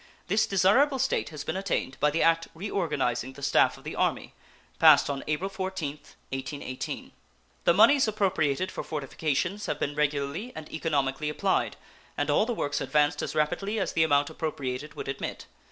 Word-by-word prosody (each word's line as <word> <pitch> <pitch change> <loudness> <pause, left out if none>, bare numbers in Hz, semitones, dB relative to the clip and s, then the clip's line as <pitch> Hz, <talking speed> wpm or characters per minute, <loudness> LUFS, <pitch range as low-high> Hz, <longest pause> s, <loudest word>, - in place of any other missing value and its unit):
This 210 +4 +3
desirable 230 +9 +4
state 265 +1 0
has 150 -2 -7
been - - -3
attained 190 -8 -2
by 150 - +4
the 160 +3 +1
act 165 0 +3
reorganizing 140 - -1
the 140 - -12
staff 135 - +3
of - - -16
the - - -6
Army, - - -1 0.5
passed - - +7
on 135 -1 -4
April 155 +5 -1
14th, 190 -7 -5 0.2
1818. 135 -1 -5 0.5
The 170 - +6
moneys 235 +6 +6
appropriated 185 -6 0
for - - -5
fortifications 155 +6 -2
have - - -2
been 145 - -1
regularly 150 - -1
and 155 -1 -7
economically 150 -2 -1
applied, 150 +6 0 0.4
and - - 0
all 215 - +3
the 240 - -1
works 145 -6 -1
advanced 150 -1 +2
as - - -4
rapidly 175 +8 0
as 190 - -1
the 160 - +2
amount 145 -2 +2
appropriated 145 -3 -4
would - - -6
admit. 135 - -4
155 Hz, 170 wpm, -28 LUFS, 140-195 Hz, 0.5 s, passed